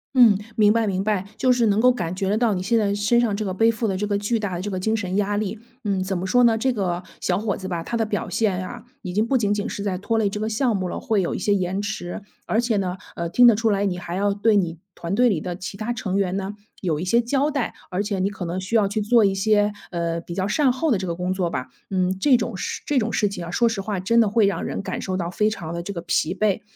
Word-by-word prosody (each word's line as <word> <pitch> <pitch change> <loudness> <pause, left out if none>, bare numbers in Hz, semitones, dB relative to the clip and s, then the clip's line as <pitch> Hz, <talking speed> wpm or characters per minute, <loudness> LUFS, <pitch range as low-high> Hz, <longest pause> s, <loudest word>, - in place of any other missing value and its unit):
嗯， 230 -6 +7 0.2
明 210 -2 +5
白 225 -1 +1
明 190 -1 0
白， 200 -2 0
就 255 - +3
是 240 -2 +3
能 205 0 +2
够 250 - +6
感 175 -7 -3
觉 190 0 -1
得 210 - +2
到， 235 -2 +2
你 180 - -3
现 230 +4 +2
在 200 -2 +1
身 205 +4 +3
上 230 -4 +1
这 215 - -2
个 190 - -2
背 225 +4 +4
负 225 0 -2
的 190 - -1
这 210 +2 -1
个 205 -1 +1
巨 205 +3 0
大 200 -4 -3
的 175 - -3
这 205 +2 -4
个 185 - -2
精 220 +4 0
神 185 -4 -3
压 205 0 +1
力， 210 +1 -3 0.2
嗯， 195 -3 0
怎 190 0 -2
么 180 - -3
说 245 +6 +4
呢？ 225 -1 +4
这 260 +4 +1
个 180 -4 -2 0.2
小 180 0 +1
伙 205 -1 -1
子 190 - -6
吧， 170 -3 -3
他 235 - -4
的 225 - +1
表 210 -1 -2
现 190 -2 0
啊， 240 0 -9 0.2
已 180 -3 -5
经 215 +4 +1
不 265 +1 +3
仅 205 -3 +1
仅 205 +2 -2
是 200 - -5
在 195 -3 -1
拖 225 +4 -1
累 215 -2 +2
这 210 - -5
个 215 +1 -1
项 225 +1 +1
目 185 -2 -1
了， - - -4
会 215 -3 +1
有 175 - -1
一 - - -2
些 205 - +2
延 190 0 0
迟。 205 -2 -4 0.3
而 220 - +1
且 235 -3 0
呢， 185 -2 -1 0.2
呃， 170 - -2
听 245 +8 +5
得 235 - +7
出 225 +1 +1
来 200 -1 +1
你 185 -3 -1
还 175 -1 -5
要 200 +1 +1
对 210 +2 +2
你 170 -5 0 0.2
团 170 +2 -4
队 245 +5 +4
里 190 -7 +1
的 180 0 -4
其 185 +1 -6
他 215 +3 -3
成 195 -5 -3
员 190 -2 0
呢， 195 +1 -3 0.3
有 165 -5 0
一 - - -3
些 235 +6 +3
交 275 +5 +1
代。 275 -5 -2 0.2
而 185 +2 0
且 205 -2 -2
你 190 +2 +1
可 195 -3 -6
能 175 +2 -3
需 190 +5 -3
要 205 -3 +3
去 215 +2 -2
做 220 +1 +4
一 195 -1 +2
些， 205 +1 +2 0.2
呃， 170 -1 -2
比 170 - -8
较 190 +2 -1
善 265 +5 +3
后 285 +6 -1
的 235 - +3
这 190 - -4
个 170 - -2
工 180 +2 -1
作 185 -2 -1
吧。 130 -6 -4 0.2
嗯， 185 0 +1
这 250 +5 +4
种 230 -3 -3
事 185 - -4
这 290 - 0
种 225 -2 +1
事 210 - +2
情 200 -3 -5
啊， 170 - -7
说 235 +6 +3
实 215 -4 -3
话 200 -1 -3
真 230 +6 +2
的 220 - +3
会 215 +1 +3
让 200 - -1
人 - - -3
感 - - -4
受 185 -1 -2
到 170 -2 -2
非 210 +4 +1
常 170 -6 -5
地 170 0 -4
这 200 - -5
个 170 - -5
疲 - - 0
惫。 215 -1 +1
205 Hz, 325 characters per minute, -23 LUFS, 185-220 Hz, 0.3 s, 嗯